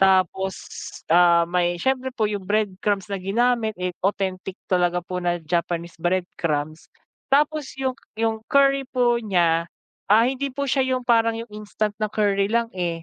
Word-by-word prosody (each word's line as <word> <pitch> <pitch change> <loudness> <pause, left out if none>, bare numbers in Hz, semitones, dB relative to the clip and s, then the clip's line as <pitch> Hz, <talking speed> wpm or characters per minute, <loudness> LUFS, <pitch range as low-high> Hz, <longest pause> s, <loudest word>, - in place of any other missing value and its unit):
Tapos, 190 0 +3 0.6
ah, 170 -1 +6
may 175 0 0
siyempre 260 +6 0
po 220 - 0
yung 200 -3 -4
breadcrumbs 205 -1 -1
na 195 - -1
ginamit, 220 +3 +1
eh, 180 0 -2 0.2
authentic 190 -1 -2 0.2
talaga 180 -1 +2
po 180 0 -5
na 175 -1 -1
Japanese 170 +1 -2
breadcrumbs. 165 -3 -2 0.4
Tapos 295 0 +1
yung, 265 -1 -1 0.2
yung 225 0 0
curry 275 -1 +3
po 240 -2 +2
niya, 170 -5 +2 0.4
ah, 215 +3 +6
hindi 270 +2 -1
po 280 - -2
siya 265 -1 +2
yung 255 - -4
parang 230 -1 +3
yung 230 0 -7
instant 210 0 -3
na 215 - 0
curry 200 -2 +1
lang, 230 +1 0
eh. 170 -2 -2
200 Hz, 155 wpm, -23 LUFS, 175-235 Hz, 0.6 s, ah